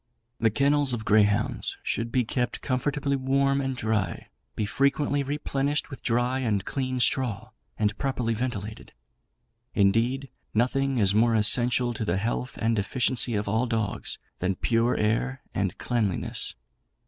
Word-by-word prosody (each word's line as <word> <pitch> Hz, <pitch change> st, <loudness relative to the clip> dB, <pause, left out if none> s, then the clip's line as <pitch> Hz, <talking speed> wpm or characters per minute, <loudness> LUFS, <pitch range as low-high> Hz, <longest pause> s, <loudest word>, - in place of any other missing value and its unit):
The 115 Hz, -, +3 dB
kennels 140 Hz, +3 st, +2 dB
of 110 Hz, -2 st, -3 dB
greyhounds 105 Hz, -1 st, +2 dB
should 115 Hz, 0 st, -2 dB
be 125 Hz, -1 st, +1 dB
kept 125 Hz, +2 st, -2 dB
comfortably 140 Hz, +2 st, -1 dB
warm 140 Hz, +1 st, +1 dB
and 135 Hz, -1 st, -2 dB
dry, 110 Hz, -7 st, -1 dB, 0.3 s
be 105 Hz, -, -1 dB
frequently 140 Hz, +5 st, +1 dB
replenished 145 Hz, +1 st, -1 dB
with 135 Hz, -, -8 dB
dry 120 Hz, +2 st, +1 dB
and 105 Hz, -6 st, 0 dB
clean 130 Hz, -2 st, -2 dB
straw, 120 Hz, -4 st, 0 dB, 0.3 s
and 105 Hz, -1 st, +1 dB
properly 125 Hz, -4 st, -1 dB
ventilated. 110 Hz, -3 st, -5 dB, 0.8 s
Indeed, 115 Hz, +7 st, +2 dB, 0.3 s
nothing 135 Hz, +3 st, +1 dB
is 100 Hz, -3 st, +4 dB
more 115 Hz, +2 st, +4 dB
essential 120 Hz, +3 st, +3 dB
to 110 Hz, -, -4 dB
the 95 Hz, -3 st, 0 dB
health 120 Hz, +5 st, -2 dB
and 115 Hz, -1 st, +1 dB
efficiency 120 Hz, +3 st, +1 dB
of 105 Hz, 0 st, -1 dB
all 110 Hz, +5 st, +1 dB
dogs 110 Hz, -3 st, -1 dB, 0.2 s
than 95 Hz, +1 st, 0 dB
pure 115 Hz, +4 st, +1 dB
air 120 Hz, +5 st, 0 dB
and 95 Hz, -3 st, -1 dB
cleanliness. 110 Hz, -7 st, -1 dB
120 Hz, 140 wpm, -26 LUFS, 110-135 Hz, 0.8 s, is